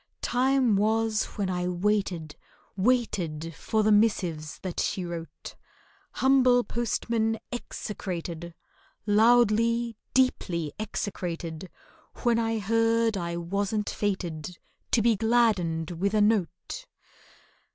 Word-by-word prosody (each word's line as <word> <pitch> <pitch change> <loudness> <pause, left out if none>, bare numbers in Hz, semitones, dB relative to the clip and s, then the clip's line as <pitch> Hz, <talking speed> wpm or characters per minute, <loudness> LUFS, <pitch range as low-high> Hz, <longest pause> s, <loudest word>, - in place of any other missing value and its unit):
Time 255 -3 +2
was 220 +1 +1
when 200 -2 0
I 180 -1 -1
waited, 180 -4 -1 0.4
waited 185 -8 0
For 220 +7 0
the 215 - +3
missives 180 -8 +1
that 185 -2 -4
she 185 - -1
wrote, 170 -1 -7 0.6
Humble 255 -2 +4
postmen 230 -1 -1
execrated— 175 -8 -5 0.5
Loudly, 230 +1 +3 0.2
deeply 170 - +1
execrated— 180 -5 -4 0.5
When 235 -2 +3
I 225 0 0
heard 225 +1 +2
I 170 -2 -3
wasn't 200 +4 -1
fated 180 -4 -3 0.3
To 225 - +3
be 230 -1 +4
gladdened 195 -8 +1
with 195 +5 -1
a 210 - +4
note! 215 - 0
210 Hz, 100 wpm, -27 LUFS, 175-230 Hz, 0.6 s, Humble